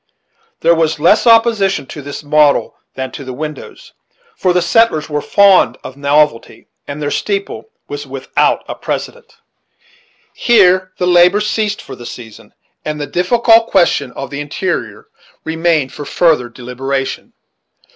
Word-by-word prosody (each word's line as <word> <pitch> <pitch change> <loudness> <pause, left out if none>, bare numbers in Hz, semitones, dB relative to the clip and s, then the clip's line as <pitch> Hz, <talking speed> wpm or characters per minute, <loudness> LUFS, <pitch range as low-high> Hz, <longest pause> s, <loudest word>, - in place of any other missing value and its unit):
There 170 - +4
was 160 -2 0
less 205 +10 +3
opposition 225 - +3
to 145 - -9
this 145 +1 -8
model 150 0 +2 0.2
than 130 -1 -5
to - - -8
the 130 -1 -7
windows; 155 +2 -8 0.4
for 185 - 0
the 180 - +2
settlers 175 -4 +1
were 150 0 -1
fond 200 +2 +4
of 130 - -9
novelty, 140 -3 0 0.2
and 140 +1 -6
their 145 -1 -3
steeple 200 - -3 0.2
was 430 0 -7
without - - -1
a - - -4
precedent. - - -6 1.0
Here 185 -5 +3
the 180 - -1
labor 180 +2 +4
ceased 210 0 -2
for 135 - -9
the 120 -1 -10
season, 115 -3 -12 0.3
and 150 0 -4
the 145 - -3
difficult 225 - +3
question 170 -8 +1
of 135 - -7
the 140 - -5
interior 145 - -4 0.4
remained 160 -4 0
for 145 - -8
further 155 -6 +1
deliberation. 130 +3 -5
155 Hz, 145 wpm, -15 LUFS, 140-195 Hz, 1.0 s, There